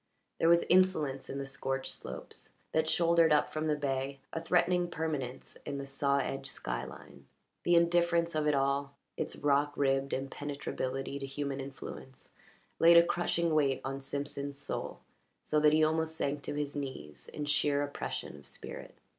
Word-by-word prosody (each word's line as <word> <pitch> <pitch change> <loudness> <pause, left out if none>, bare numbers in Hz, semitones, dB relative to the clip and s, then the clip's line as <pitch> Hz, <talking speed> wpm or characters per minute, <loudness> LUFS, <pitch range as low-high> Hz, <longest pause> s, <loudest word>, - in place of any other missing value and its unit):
There 165 - +4
was 170 0 +6
insolence 165 -7 +3
in 140 - -4
the 140 - -3
scorched 135 0 -3
slopes 65 0 -9 0.2
that 160 0 +1
shouldered 170 -1 +4
up 150 - +3
from 155 0 -1
the 150 - +2
bay, 135 -1 -2 0.2
a 165 - -2
threatening 175 +1 +2
permanence 150 -7 -4
in 140 - -4
the 140 - -4
saw 140 0 +1
edged 135 0 -2
sky - - -4
line. 70 0 -12 0.3
The 175 - +3
indifference 170 0 +3
of 155 -1 +1
it 150 - +3
all, 140 +1 0 0.2
its - - -2
rock 145 0 +2
ribbed 135 0 +2
impenetrability 135 0 -3
to 135 - -5
human 140 0 -3
influence, 135 -1 -9 0.5
laid 170 +1 +8
a 170 - +8
crushing 170 -1 +1
weight 140 -3 +3
on 135 +1 -4
Simpson's 140 0 -4
soul, - - -4 0.4
so 155 - +2
that 150 0 +6
he 155 +1 +4
almost 160 +1 +1
sank 145 -2 -1
to - - -3
his 145 -1 -2
knees 130 - -6
in 150 - -5
sheer 145 -1 +2
oppression 145 - -4
of 70 - -11
spirit. - - -8
145 Hz, 170 wpm, -32 LUFS, 135-160 Hz, 0.5 s, laid